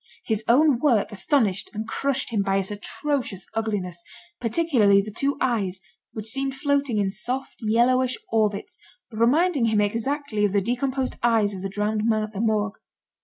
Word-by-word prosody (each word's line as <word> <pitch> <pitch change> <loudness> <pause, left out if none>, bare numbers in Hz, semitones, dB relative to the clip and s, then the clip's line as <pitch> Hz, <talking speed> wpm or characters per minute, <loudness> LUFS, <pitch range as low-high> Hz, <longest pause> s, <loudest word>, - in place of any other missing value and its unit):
His 220 -1 -1
own 275 +1 +4
work 240 -7 +2
astonished 205 -1 +1
and 215 +1 -4
crushed 265 +2 -1
him 215 -3 +1
by 195 0 +1
its 195 +1 -2
atrocious 215 -1 -3
ugliness; 195 -6 -2 0.4
particularly 230 -6 +3
the 205 +2 -3
two 280 0 0
eyes 200 -7 0 0.3
which 215 -2 -6
seemed 270 +4 -2
floating 280 -4 0
in 200 -2 +1
soft, 250 +6 -2
yellowish 245 +3 +2
orbits, 210 -2 0 0.3
reminding 265 +6 +2
him 220 -2 +2
exactly 230 +2 -1
of 205 -2 +2
the 205 - +4
decomposed 255 +4 -2
eyes 225 -4 +2
of 190 - -6
the 195 - -3
drowned 210 +2 -1
man 215 -1 +2
at 215 0 -6
the 200 - -3
Morgue. 215 -2 0
225 Hz, 165 wpm, -24 LUFS, 205-260 Hz, 0.4 s, own